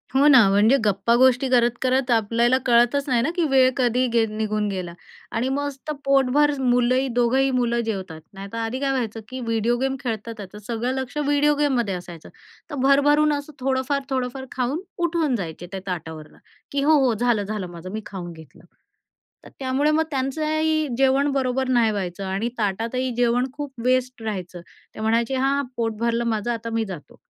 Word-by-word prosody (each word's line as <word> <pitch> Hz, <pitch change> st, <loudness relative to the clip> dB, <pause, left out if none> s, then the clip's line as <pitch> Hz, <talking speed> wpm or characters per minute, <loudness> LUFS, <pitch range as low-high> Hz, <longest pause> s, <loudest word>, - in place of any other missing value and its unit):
हो 280 Hz, +2 st, +5 dB
ना, 260 Hz, -8 st, +7 dB
म्हणजे 210 Hz, +7 st, +4 dB
गप्पा 205 Hz, +2 st, +2 dB
गोष्टी 260 Hz, +1 st, +4 dB
करत 240 Hz, -1 st, +3 dB
करत 260 Hz, 0 st, +1 dB
आपल्याला 235 Hz, +2 st, +3 dB
कळतच 245 Hz, +3 st, +3 dB
नाही 245 Hz, -3 st, +2 dB
ना 270 Hz, -, 0 dB
की 350 Hz, -, +1 dB
वेळ 260 Hz, -1 st, +5 dB
कधी 250 Hz, 0 st, +2 dB
गे 230 Hz, -1 st, +4 dB
निघून 215 Hz, -1 st, -2 dB
गेला 185 Hz, -3 st, -4 dB, 0.4 s
आणि 240 Hz, +3 st, 0 dB
मस्त 285 Hz, +1 st, -4 dB
पोटभर 275 Hz, +2 st, +3 dB
मुलंही, 250 Hz, +1 st, +2 dB
दोघंही 260 Hz, +3 st, +3 dB
मुलं 240 Hz, -2 st, +1 dB
जेवतात. 190 Hz, -7 st, -5 dB
नाहीतर 195 Hz, +3 st, -8 dB
आधी 230 Hz, +3 st, -3 dB
काय 275 Hz, 0 st, 0 dB
व्हायचं 230 Hz, -4 st, -2 dB
की 260 Hz, 0 st, -6 dB
व्हिडिओ 230 Hz, 0 st, 0 dB
गेम 265 Hz, +1 st, 0 dB
खेळतात, 230 Hz, -2 st, -4 dB, 0.2 s
तर -, -, -9 dB
सगळं 235 Hz, +2 st, -2 dB
लक्ष 260 Hz, +2 st, -8 dB
व्हिडिओ 290 Hz, 0 st, +2 dB
गेममध्ये 260 Hz, -8 st, +1 dB
असायचं, 175 Hz, -2 st, -10 dB, 0.4 s
तर 295 Hz, -, -5 dB
भरभरून 290 Hz, +2 st, +4 dB
असं 285 Hz, +1 st, -5 dB
थोडंफार-थोडंफार 265 Hz, 0 st, -2 dB
खाऊन 260 Hz, +6 st, -2 dB, 0.3 s
उठून 320 Hz, -6 st, 0 dB
जायचे 175 Hz, -4 st, -6 dB
त्या 195 Hz, -, -4 dB
ताटावरनं 160 Hz, -4 st, -6 dB, 0.3 s
की 280 Hz, -, 0 dB
"हो 310 Hz, +1 st, +5 dB
हो, 245 Hz, -, +2 dB
झालं-झालं 215 Hz, -4 st, -1 dB
माझं, 170 Hz, +1 st, -9 dB
मी 220 Hz, +2 st, -4 dB
खाऊन 180 Hz, -3 st, -7 dB
घेतलं." 160 Hz, -1 st, -15 dB, 0.8 s
तर -, -, -11 dB
त्यामुळे 270 Hz, +3 st, +1 dB
मग 315 Hz, +1 st, +2 dB
त्यांचंही 310 Hz, +3 st, 0 dB
जेवण 270 Hz, +2 st, +3 dB
बरोबर 265 Hz, -1 st, 0 dB
नाही 235 Hz, -3 st, +3 dB
व्हायचं 195 Hz, -1 st, -4 dB
आणि 195 Hz, +5 st, -2 dB
ताटातही 230 Hz, +5 st, -1 dB
जेवण 245 Hz, +1 st, +1 dB
खूप 290 Hz, -1 st, -6 dB
वेस्ट 255 Hz, -1 st, +1 dB
राहायचं. 185 Hz, -5 st, -5 dB, 0.3 s
ते -, -, -9 dB
म्हणायचे, 230 Hz, +3 st, +1 dB
"हां 275 Hz, +2 st, +1 dB
पोट 225 Hz, -2 st, -1 dB
भरलं 235 Hz, 0 st, 0 dB
माझं, 215 Hz, +3 st, -2 dB
आता 230 Hz, 0 st, -4 dB
मी 225 Hz, -1 st, -1 dB
जातो." 180 Hz, -7 st, -10 dB
245 Hz, 170 wpm, -23 LUFS, 220-270 Hz, 0.8 s, ना